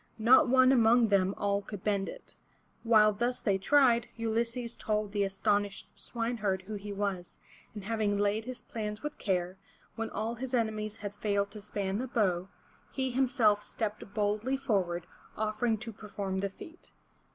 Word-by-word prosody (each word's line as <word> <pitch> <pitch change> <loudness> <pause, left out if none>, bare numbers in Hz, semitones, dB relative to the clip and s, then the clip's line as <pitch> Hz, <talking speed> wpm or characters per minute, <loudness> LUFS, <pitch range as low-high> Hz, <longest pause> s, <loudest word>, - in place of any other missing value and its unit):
Not 240 +4 +6
one 260 0 +6
among 235 -2 +5
them 195 -1 +2
all 200 0 0
could 205 -1 -8
bend 200 -2 0
it. - - -11 0.5
While 215 -2 +5
thus 240 +4 -1
they 195 -3 +1
tried, 240 0 +4
Ulysses 230 +1 -1
told 210 -1 -1
the 205 -1 +1
astonished 200 +1 0
swineherd 225 -5 -2
who 210 +3 -7
he 205 0 -6
was, 195 -3 -3 0.4
and 205 - -6
having 210 -1 0
laid 205 +2 +1
his 255 0 -6
plans 210 -2 -5
with 300 0 -5
care, 185 -1 -1 0.4
when 225 0 -3
all 220 +2 -3
his 255 +2 -3
enemies 215 -2 -1
had 205 -2 -6
failed 200 -1 -1
to 210 - -9
span 200 -1 -3
the 260 - -3
bow, 190 -7 +1 0.4
he 265 -1 -1
himself 245 -5 +3
stepped 210 -3 -4
boldly 215 +5 0
forward, 180 -9 -1 0.3
offering 215 +1 0
to 230 +1 -7
perform 200 -2 -4
the 200 +1 -1
feat. 320 - -14
215 Hz, 165 wpm, -30 LUFS, 200-235 Hz, 0.5 s, Not